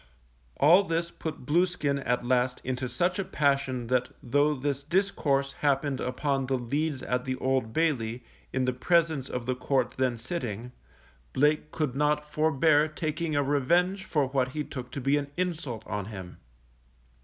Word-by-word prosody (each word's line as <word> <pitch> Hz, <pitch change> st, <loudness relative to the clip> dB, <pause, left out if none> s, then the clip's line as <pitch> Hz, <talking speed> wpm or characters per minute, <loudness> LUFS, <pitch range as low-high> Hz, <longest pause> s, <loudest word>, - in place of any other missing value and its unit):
All 170 Hz, +7 st, +7 dB
this 170 Hz, -1 st, -1 dB
put 160 Hz, -5 st, -6 dB
Blueskin 155 Hz, -3 st, +1 dB
at 125 Hz, 0 st, +1 dB
last 125 Hz, 0 st, +1 dB
into 130 Hz, 0 st, -2 dB
such 175 Hz, +10 st, 0 dB
a -, -, +1 dB
passion 140 Hz, -7 st, 0 dB
that 125 Hz, +1 st, +1 dB
though 145 Hz, +4 st, +2 dB
this 140 Hz, 0 st, -2 dB
discourse 145 Hz, -5 st, +1 dB
happened 140 Hz, -1 st, 0 dB
upon 135 Hz, +1 st, -1 dB
the 135 Hz, 0 st, +1 dB
leads 140 Hz, +3 st, -2 dB
at 125 Hz, 0 st, -1 dB
the 130 Hz, 0 st, -2 dB
Old 130 Hz, -3 st, 0 dB
Bailey; 125 Hz, -6 st, 0 dB, 0.3 s
in 130 Hz, -1 st, 0 dB
the 130 Hz, -, +1 dB
presence 160 Hz, 0 st, +1 dB
of 125 Hz, -1 st, -4 dB
the 130 Hz, -, 0 dB
Court 130 Hz, +1 st, 0 dB
then 125 Hz, -2 st, +1 dB
sitting, 120 Hz, -, -4 dB, 0.6 s
Blake 150 Hz, +2 st, +2 dB
could 150 Hz, -6 st, -2 dB
not 150 Hz, +1 st, +1 dB
forbear 155 Hz, 0 st, +3 dB
taking 155 Hz, +1 st, -3 dB
a 145 Hz, -, +3 dB
revenge 170 Hz, +8 st, +2 dB
for 150 Hz, -6 st, +1 dB
what 130 Hz, -1 st, 0 dB
he 150 Hz, +4 st, -3 dB
took 125 Hz, -4 st, -7 dB
to 140 Hz, -, -4 dB
be 135 Hz, +3 st, +2 dB
an 145 Hz, -1 st, -3 dB
insult 155 Hz, -11 st, -3 dB
on 105 Hz, -1 st, -3 dB
him. 95 Hz, -4 st, -8 dB
140 Hz, 165 wpm, -28 LUFS, 125-155 Hz, 0.6 s, All